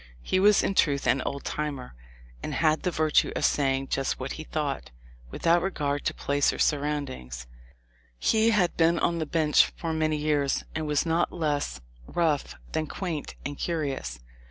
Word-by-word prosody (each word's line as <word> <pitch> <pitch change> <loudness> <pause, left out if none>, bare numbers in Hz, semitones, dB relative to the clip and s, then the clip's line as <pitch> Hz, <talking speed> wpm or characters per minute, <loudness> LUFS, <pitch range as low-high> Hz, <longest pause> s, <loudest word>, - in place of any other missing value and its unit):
He 185 - +1
was 205 +1 +5
in - - 0
truth 140 -7 +2
an 130 +2 +3
"old 140 0 -4
timer," 145 -4 -4 0.5
and - - -4
had 155 -1 +2
the 180 - 0
virtue 155 -3 +2
of - - +1
saying 135 -1 +1
just 135 -1 -1
what - - -4
he - - -6
thought, - - -3 0.4
without 170 - +2
regard 145 -6 -2
to - - +1
place 140 0 +1
or - - -6
surroundings. 140 - -1 0.7
He 220 - +3
had 195 -6 +2
been 170 0 +4
on 170 0 +1
the 160 - -2
bench 155 -1 +4
for 165 -1 -3
many 155 -1 +1
years 150 -2 +1
and 155 -1 -3
was 150 +1 +1
not 165 +1 +1
less 145 - -2 0.3
rough 160 -5 0 0.2
than 160 -1 -1
quaint 165 -3 -4
and 145 +1 -5
curious. 140 - -2
150 Hz, 170 wpm, -27 LUFS, 140-165 Hz, 0.7 s, was